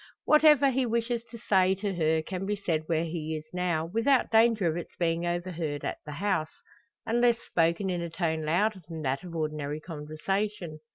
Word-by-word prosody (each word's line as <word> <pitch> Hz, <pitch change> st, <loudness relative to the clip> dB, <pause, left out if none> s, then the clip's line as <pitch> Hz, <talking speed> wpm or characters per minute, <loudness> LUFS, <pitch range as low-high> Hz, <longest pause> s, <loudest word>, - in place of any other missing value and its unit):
Whatever 300 Hz, -3 st, +6 dB
he 260 Hz, +1 st, +1 dB
wishes 235 Hz, 0 st, -1 dB
to 235 Hz, -, -9 dB
say 190 Hz, -3 st, +3 dB
to 195 Hz, 0 st, -3 dB
her 160 Hz, -2 st, +1 dB
can 185 Hz, +3 st, -4 dB
be 210 Hz, -, 0 dB
said 165 Hz, -6 st, -2 dB
where 165 Hz, -1 st, +1 dB
he 160 Hz, -2 st, -3 dB
now 175 Hz, -3 st, 0 dB
is, 170 Hz, -, -11 dB
without 250 Hz, +4 st, +2 dB
danger 225 Hz, -3 st, +4 dB
of 160 Hz, -1 st, +1 dB
its 175 Hz, -, -6 dB
being 170 Hz, 0 st, 0 dB
overheard 175 Hz, -4 st, -3 dB
at -, -, -3 dB
the 150 Hz, -, -5 dB
house 185 Hz, -2 st, -1 dB, 0.5 s
unless 240 Hz, +1 st, +3 dB
spoken 170 Hz, -2 st, 0 dB
in 175 Hz, -1 st, -2 dB
a 170 Hz, -, -4 dB
tone 160 Hz, -2 st, -1 dB
louder 185 Hz, +6 st, +1 dB
than 160 Hz, -2 st, -6 dB
that 135 Hz, +4 st, -1 dB
of 175 Hz, -2 st, -8 dB
ordinary 150 Hz, -2 st, -3 dB
conversation. 165 Hz, +3 st, -3 dB
175 Hz, 185 wpm, -28 LUFS, 160-210 Hz, 0.5 s, Whatever